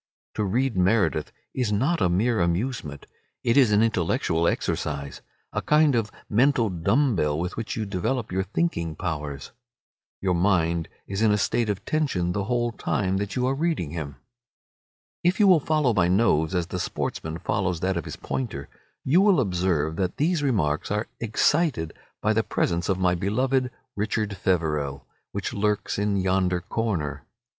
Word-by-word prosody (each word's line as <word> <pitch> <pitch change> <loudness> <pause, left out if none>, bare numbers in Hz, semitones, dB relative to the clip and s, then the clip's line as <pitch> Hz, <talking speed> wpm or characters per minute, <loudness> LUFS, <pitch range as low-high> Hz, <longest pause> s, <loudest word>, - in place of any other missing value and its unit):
To 105 - -1
read 120 +5 0
Meredith 90 -5 +2 0.2
is 125 -5 -1
not 135 +12 +1
a 90 - +3
mere 110 +6 +1
amusement; 85 - -2 0.4
it 115 - +2
is 130 -6 +5
an 105 +1 +4
intellectual 85 -5 +1
exercise, 70 -2 -2 0.3
a - - -1
kind 150 -1 +4
of 115 -3 0 0.2
mental 115 -1 +3
dumb 105 - +2
bell 75 -3 +1
with 90 +3 -3
which 115 -1 -4
you 110 - -2
develop 105 +5 -2
your 95 +1 0
thinking 95 - -1
powers. 75 -5 -4 0.7
Your 95 -2 +1
mind 85 -2 +1 0.2
is 95 +1 -3
in 110 -1 +4
a 105 - +3
state 110 +3 0
of 100 -2 -3
tension 130 - 0
the 100 +1 -2
whole 120 +1 0
time 95 -3 -1
that 100 0 -3
you 125 -1 +1
are 130 - +1
reading 150 - -1
him. 75 -4 -5 1.1
If 175 +4 +2
you 210 - +6
will 185 -4 +7
follow 150 -4 +1
my 90 -5 +3
nose 90 -3 +2
as 90 -1 +1
the 90 +1 -5
sportsman 80 -2 -3
follows 90 -2 -1
that 95 0 0
of 85 - -3
his - - -6
pointer, 100 - -4 0.3
you 160 +8 +4
will 200 -5 +5
observe 90 - 0
that 90 -2 -1
these 160 +2 +1
remarks 90 - 0
are 105 +2 -1
excited 115 - +1 0.3
by 110 - +3
the 110 - +3
presence 85 -4 -1
of 95 - +2
my 90 -1 +2
beloved 125 +8 0 0.3
"Richard 105 0 -1
Feverel," 75 -7 -1 0.3
which - - -4
lurks 105 -1 0
in 100 -1 +1
yonder 95 -1 +1
corner. 90 -6 -2
100 Hz, 165 wpm, -25 LUFS, 85-120 Hz, 1.1 s, will